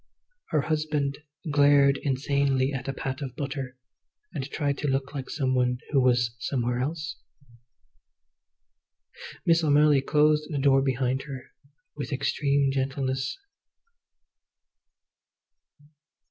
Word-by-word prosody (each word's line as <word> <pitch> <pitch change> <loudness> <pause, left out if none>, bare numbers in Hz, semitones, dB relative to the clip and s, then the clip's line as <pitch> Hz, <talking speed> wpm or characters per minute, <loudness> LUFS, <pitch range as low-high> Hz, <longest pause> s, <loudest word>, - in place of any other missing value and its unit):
Her 155 - +1
husband 150 -2 -1 0.3
glared 140 -1 +5
insanely 140 0 +1
at 135 -1 -4
a - - 0
pat 130 0 -4
of 135 -3 -5
butter, 135 -3 -5 0.6
and 135 +1 -4
tried 145 -2 -1
to 150 - -2
look 135 +1 -1
like 135 -3 -5
some 130 -3 -1
one 125 -1 +1
who 140 -3 +4
was 120 -2 +2
somewhere 120 -1 -1
else. 155 +4 -3 2.3
Miss 165 0 +4
O'Malley 145 -1 +4
closed 150 +2 +2
the 150 - -3
door 135 -1 +4
behind 130 -1 0
her 135 -3 -8 0.4
with 145 - -5
extreme 140 0 +1
gentleness. 135 - -2
140 Hz, 110 wpm, -26 LUFS, 130-145 Hz, 2.3 s, glared